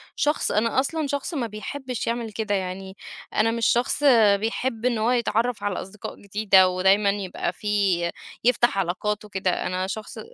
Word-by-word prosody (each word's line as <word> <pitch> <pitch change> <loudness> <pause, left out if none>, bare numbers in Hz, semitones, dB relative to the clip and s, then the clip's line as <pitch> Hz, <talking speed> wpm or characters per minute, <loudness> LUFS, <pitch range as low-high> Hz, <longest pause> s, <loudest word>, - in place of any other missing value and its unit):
شخص 295 +1 +1
أنا 230 +4 +1
أصلًا 305 +3 -1
شخص 285 +5 -3
ما 260 -7 -1
بيحبش 250 +3 -5
يعمل 230 -1 -2
كده 210 -1 -1
يعني، 190 0 -5 0.4
أنا 225 +2 +2
مش 230 -1 -1
شخص 250 +4 +1 0.4
بيحب 225 +2 -2
إنّه 235 -3 +1
هو 230 +3 +2
يتعرف 235 -1 0
على 205 -3 -2
أصدقاء 195 +2 -8
جديدة 200 -2 +4
ودايمًا 195 +3 +3
يبقى 195 -3 -2
فيه 195 -5 0 0.3
يفتح 240 -3 +3
علاقات 200 +3 -1
وكده 190 -3 -1
أنا 185 +1 -2
شخص 215 +2 -6
215 Hz, 155 wpm, -24 LUFS, 195-240 Hz, 0.4 s, جديدة